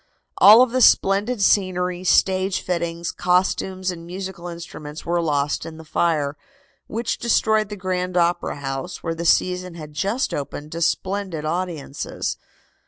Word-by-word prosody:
All 220 +5 +9
of 255 - -1
the 255 +1 +1
splendid 200 +2 +4
scenery, 180 -2 +1
stage 190 +1 +2
fittings, 170 -1 -2
costumes 185 +1 0
and 170 -2 -9
musical 180 0 -7
instruments 165 -3 -8
were 170 0 +1
lost 145 -3 0
in 160 -1 -8
the 160 - -11
fire, 155 -3 0 0.5
which 225 +1 -3
destroyed 220 -2 +2
the 210 - -5
Grand 180 -1 -2
Opera 175 0 +1
House, 135 +6 -5
where 165 - -1
the 165 +1 -5
season 180 +1 +1
had 155 -2 -9
just 200 - -1
opened 145 +1 -5
to 170 - -5
splendid 185 -2 -1
audiences. 160 -4 -3
180 Hz, 145 wpm, -22 LUFS, 165-190 Hz, 0.5 s, All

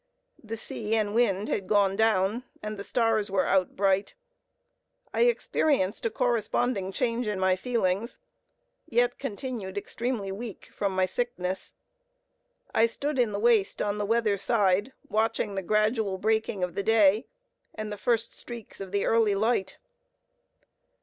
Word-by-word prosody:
The 225 0 -5
sea 220 0 -2
and 210 -2 0
wind 215 -3 +2
had 195 -2 -2
gone 200 -2 +3
down, 220 +1 +2 0.2
and 215 0 -4
the - - -4
stars 220 0 +1
were 190 -1 +1
out 190 -2 +1
bright. 195 0 +1 1.0
I 475 - +4
experienced 280 - +1
a - - -1
corresponding 225 -3 0
change 235 +2 -1
in 205 -2 -1
my 190 0 +3
feelings; 215 0 -1 0.7
yet 240 +1 +2
continued 225 -6 -5
extremely 225 -1 -3
weak 215 0 -8
from 195 -2 -1
my 185 0 +3
sickness. 190 -4 -3 1.0
I 225 - +5
stood 280 +4 -2
in 235 -3 +3
the 200 - -2
waist 225 -3 +3
on 205 0 -1
the 205 - -1
weather 225 -2 +2
side, 205 +1 +2 0.2
watching 220 -1 0
the 195 - -2
gradual 215 0 +1
breaking 215 -1 0
of 180 -1 -2
the 200 - -1
day, 215 0 +4 0.5
and 215 -1 -5
the - - -3
first 230 +1 0
streaks 235 -4 -8
of 190 -1 -7
the 200 0 0
early 225 -3 +3
light. 200 -2 0
215 Hz, 150 wpm, -27 LUFS, 195-230 Hz, 1.0 s, I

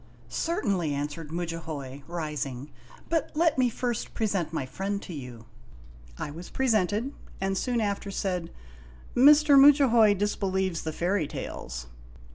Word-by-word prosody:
"Certainly," 195 - -1
answered 145 +2 -4
Mudjahoy, 160 -5 -5
rising; 150 -5 -4 0.4
"but 325 -1 0
let 320 -3 +2
me 250 -1 +4
first 240 0 -3
pre 225 - 0
sent 185 -7 -1
my 160 -5 -2
friend 195 +9 -3
to 180 - -8
you." 125 -6 -8 0.7
I 145 - -4
was 170 +4 -9
presented, 225 0 +1 0.3
and 195 0 -1
soon 245 +4 0
after 200 -2 -2
said: 180 -3 -2 0.4
" - - -20 0.3
Mr. 290 +2 +7
Mudjahoy 260 -7 +6
disbelieves 190 -3 -1
the 160 - -3
fairy 175 0 0
tales." 60 - -6
190 Hz, 135 wpm, -27 LUFS, 155-230 Hz, 0.7 s, Mr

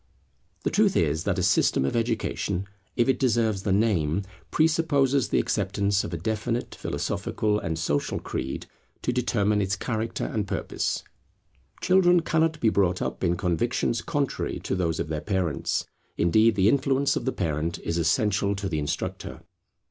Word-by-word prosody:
The - - 0
truth 205 -2 +3
is 80 +1 +1
that 100 -2 0
a 90 - 0
system 85 -6 +3
of 70 - -1
education, 110 -4 -1 0.3
if 120 - +2
it 130 -2 +2
deserve 115 -5 +1
the 100 - -1
name, 95 -4 +2 0.3
presupposes 145 -6 +2
the - - +1
acceptance 100 0 +1
of - - -5
a 85 - -3
definite 110 +7 -2
philosophical 105 -1 -1
and 80 -4 -3
social 75 -2 -1
creed 65 - -4 0.4
to 125 - 0
determine 105 -4 +1
its 95 +1 0
character 115 +1 -3
and 105 -2 -2
purpose. - - -2 0.8
Children 180 -2 +5
cannot 160 -1 +1
be 115 - +3
brought 95 -4 +2
up - - -3
in 85 -1 +2
convictions 110 +6 0
contrary 145 -3 -2
to - - -3
those 85 -4 0
of - - -1
their 75 -1 -3
parents; 95 -7 -1 0.3
indeed, 110 +6 +4
the 95 -1 +3
influence 135 +2 +2
of - - -3
the 130 - +1
parent 80 - -2
is 85 +1 -2
essential 100 +5 +1
to 100 0 -3
the 80 -5 -1
instructor. 75 - -4
105 Hz, 160 wpm, -26 LUFS, 85-120 Hz, 0.8 s, Children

